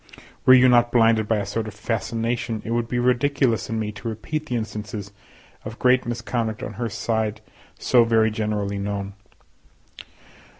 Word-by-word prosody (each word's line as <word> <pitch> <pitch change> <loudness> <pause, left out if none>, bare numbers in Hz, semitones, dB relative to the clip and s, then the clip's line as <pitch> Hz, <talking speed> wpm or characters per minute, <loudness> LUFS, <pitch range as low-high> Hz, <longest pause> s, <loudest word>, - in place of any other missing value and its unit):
Were 130 - +10
you 130 0 +6
not 120 -1 +4
blinded 115 -2 +3
by 110 - +2
a 100 - -2
sort 110 +2 -3
of 105 - -8
fascination, 115 +1 -2
it 115 - -4
would 120 0 0
be 120 - -2
ridiculous 125 -2 +1
in 115 - -2
me 105 -1 -2
to 105 +3 -8
repeat 150 +8 -4
the 125 - -2
instances 105 -2 -5 0.5
of 110 +1 -8
great 125 -1 +3
misconduct 115 -2 -3
on 105 - -5
her 115 - -1
side 110 -1 -2 0.4
so 120 -2 +4
very 110 -1 +3
generally 105 -2 -2
known. 100 0 -4
115 Hz, 165 wpm, -23 LUFS, 105-120 Hz, 0.5 s, Were